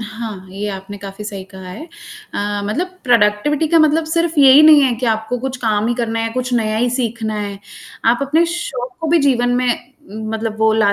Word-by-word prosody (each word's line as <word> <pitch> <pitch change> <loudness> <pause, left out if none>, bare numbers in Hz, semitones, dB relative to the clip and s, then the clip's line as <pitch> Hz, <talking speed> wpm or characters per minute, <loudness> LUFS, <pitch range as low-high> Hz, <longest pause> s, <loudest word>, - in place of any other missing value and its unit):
हाँ, 215 -3 -7
ये 200 +2 -4
आपने 195 +1 -7
काफ़ी 195 +1 -9
सही 200 -2 -6
कहा 190 -1 -11
है। 235 +12 -8 0.5
अ, 205 0 -2
मतलब 360 - -3
प्रोडक्टिविटी 240 +6 +2
का 330 - +4
मतलब 310 +1 +3
सिर्फ़ 335 0 -1
यही 275 +2 +8
नहीं 305 -2 +8
है 260 -2 +3
कि 250 +2 -3
आपको 220 +2 -1
कुछ 265 +2 -4
काम 215 -1 +1
ही 240 - 0
करना 230 -2 -2
है, 225 0 -2
कुछ 255 +1 -3
नया 215 -2 0
ही 245 +2 +1
सीखना 230 -3 -2
है, 200 -1 -5 0.5
आप 235 +1 +3
अपने 310 +5 +2
शौक 255 -7 -5
को 325 - -2
भी 335 +2 +4
जीवन 250 -4 +2
में 250 0 0 0.6
मतलब 220 0 -3
वो 220 0 +3
ला 210 -2 +3
230 Hz, 210 wpm, -18 LUFS, 210-275 Hz, 0.6 s, यही